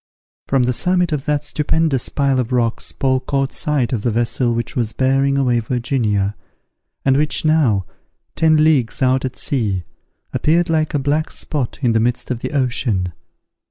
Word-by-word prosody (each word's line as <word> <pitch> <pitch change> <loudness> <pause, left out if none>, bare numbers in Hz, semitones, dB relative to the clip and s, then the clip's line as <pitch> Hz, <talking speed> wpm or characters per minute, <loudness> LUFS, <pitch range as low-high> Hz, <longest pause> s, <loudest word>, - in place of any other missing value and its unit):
From 135 -2 +2
the 125 +1 +1
summit 180 +4 +1
of 150 -2 -2
that 150 -1 0
stupendous 150 -2 0
pile 140 -2 +1
of 125 -1 -2
rocks 120 -2 0
Paul 130 -2 +1
caught 135 +1 -2
sight 140 -5 0
of 115 - -1
the 120 - 0
vessel 120 +2 0
which 115 -1 -3
was 115 -3 -1
bearing 135 +1 +2
away 125 -3 +2
Virginia, 110 -4 -1 0.7
and 135 -1 +4
which 150 +2 0
now, 135 - +3 0.5
ten 155 -1 +4
leagues 140 -6 +2
out 130 +1 +2
at 130 -1 -4
sea, 105 -9 -1 0.5
appeared 165 +2 +2
like 155 -1 0
a - - +4
black 145 +3 0
spot 140 -6 -4
in 120 -2 +3
the 110 - +3
midst 120 +3 -1
of 120 - -2
the - - -4
ocean. 120 - -1
130 Hz, 170 wpm, -19 LUFS, 120-150 Hz, 0.7 s, and